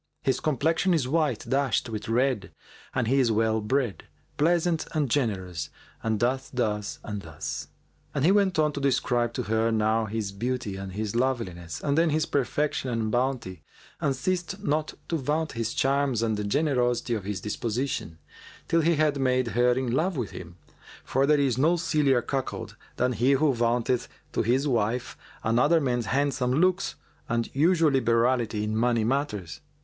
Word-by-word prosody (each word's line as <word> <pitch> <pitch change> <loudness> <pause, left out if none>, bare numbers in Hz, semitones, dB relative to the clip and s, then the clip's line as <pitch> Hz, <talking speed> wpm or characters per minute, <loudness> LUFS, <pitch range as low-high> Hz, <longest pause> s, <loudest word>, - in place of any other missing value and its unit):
His 135 - +1
complexion 160 +5 +1
is 140 -6 0
white 150 -5 0
dashed 135 -2 +1
with 110 -2 -5
red 125 -2 +1 0.4
and 125 -3 +1
he 135 +3 +3
is 125 -4 +3
well 110 0 +1
bred, 120 0 -1 0.3
pleasant 170 +1 +1
and 150 -3 +1
generous 95 - -1 0.3
and 110 -2 -1
doth 130 +3 0
thus 105 -5 -1
and 105 -1 -5
thus." 80 -4 -6 0.5
And 140 - +1
he 180 - +6
went 195 -3 +3
on 155 -1 +3
to 145 - -5
describe 120 -3 +1
to 125 - -2
her 110 +1 +1
now 110 0 +2
his 110 -1 -3
beauty 120 0 -3
and 100 +3 -4
loveliness 95 -10 -2
and 140 -1 0
then 165 +1 +3
his 155 +1 +1
perfection 140 -1 -1
and 115 -2 -1
bounty 120 - -1 0.4
and 135 - 0
ceased 185 +6 -2
not 155 -3 -1
to 165 - +1
vaunt 150 +2 -1
his 115 -1 -2
charms 135 -3 +1
and 110 -1 +1
the 105 - -3
generosity 125 -2 +1
of 105 -4 -2
his 100 -1 -3
disposition, 110 - -3 0.5
till 165 - +3
he 165 +1 +3
had 150 -2 +1
made 130 -2 +1
her 125 +1 +3
in 130 -1 -1
love 165 +6 0
with 120 -6 -3
him; 85 -1 -9 0.5
for 135 +1 +1
there 150 0 +4
is 130 -3 +1
no 165 +5 +4
sillier 150 -7 +2
cuckold 135 -2 -4 0.2
than 125 +1 +1
he 125 +4 +3
who 140 +1 +3
vaunteth 120 +1 +1 0.3
to - - +1
his 125 +6 +1
wife 120 -1 0 0.3
another 125 +9 +3
man's 120 -5 -1
handsome 135 0 +1
looks 185 +6 +2 0.3
and 115 0 -1
unusual 165 +2 +4
liberality 115 -3 +2
in 105 0 -2
money 115 0 +2
matters. 110 - -2
125 Hz, 170 wpm, -27 LUFS, 110-145 Hz, 0.5 s, he